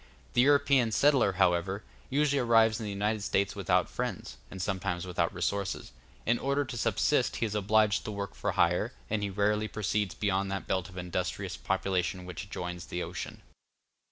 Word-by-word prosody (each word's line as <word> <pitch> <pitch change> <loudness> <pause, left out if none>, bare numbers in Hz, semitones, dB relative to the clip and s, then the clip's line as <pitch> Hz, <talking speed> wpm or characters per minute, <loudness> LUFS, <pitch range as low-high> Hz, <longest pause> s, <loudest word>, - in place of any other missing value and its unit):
The 120 - +5
European 140 -3 +4
settler, 135 -5 +4
however, 95 +2 +1 0.3
usually 145 0 +2
arrives 115 -2 +4
in 110 - -4
the - - -3
United 105 +2 -1
States 100 -1 0
without - - +2
friends, - - -4
and 95 - -8
sometimes 95 -2 -2
without 85 -1 0
resources; 95 +1 -2 0.3
in 120 +1 +2
order 140 +1 0
to 130 - -6
subsist 115 - +1
he - - 0
is 105 - -3
obliged 105 0 +3
to - - -3
work 100 -1 -4
for - - -2
hire, - - +2 0.2
and 110 -1 +1
he 100 - -1
rarely 105 +2 +1
proceeds 105 -2 -1
beyond 100 -1 0
that 95 -1 -3
belt 95 -1 -1
of 90 - -12
industrious 90 -2 -3
population 90 -1 -1
which 90 +2 -6
adjoins 90 -2 -5
the 90 - -3
ocean. - - -6
100 Hz, 175 wpm, -30 LUFS, 95-110 Hz, 0.3 s, The